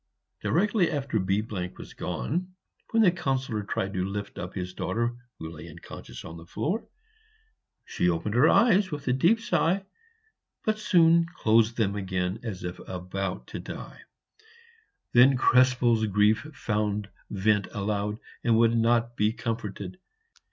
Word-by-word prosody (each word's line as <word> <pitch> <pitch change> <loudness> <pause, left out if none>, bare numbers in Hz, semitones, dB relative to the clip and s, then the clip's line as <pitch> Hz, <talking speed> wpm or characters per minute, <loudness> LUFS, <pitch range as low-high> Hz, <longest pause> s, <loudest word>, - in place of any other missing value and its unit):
Directly 195 +1 +2
after 140 -6 -1
B 95 +2 +1
was 90 -5 -6
gone, 180 +7 -3 0.3
when 225 -1 +3
the 185 - +6
Councillor 130 - -1
tried 100 -1 -3
to 95 -2 -1
lift 100 +1 -5
up 90 - -6
his 90 -1 -4
daughter, 115 +8 -1 0.2
who 80 0 -7
lay 85 +1 -10
unconscious 85 +2 -10
on 80 +1 -8
the 85 - -11
floor, 180 - -2 1.0
she 90 - 0
opened 85 +5 -1
her 125 +7 +5
eyes 205 -5 +4
with 145 -3 -6
a 125 - +3
deep 170 - +3
sigh, 195 -3 +1 0.8
but 215 0 +1
soon 170 -4 +4
closed 115 +1 +3
them 100 -3 +1
again 95 0 -2
as 105 -6 -6
if 90 0 -5
about 90 +1 -4
to - - -5
die. - - -8 1.1
Then 125 +2 +6
Krespel's 125 -3 +4
grief 105 +6 +2
found 105 -5 -1 0.2
vent 105 0 +1
aloud, 105 +1 -2 0.3
and 115 -2 +3
would 115 0 +4
not 115 +1 +2
be 105 -1 +2
comforted. 115 - -5
110 Hz, 145 wpm, -27 LUFS, 95-140 Hz, 1.1 s, the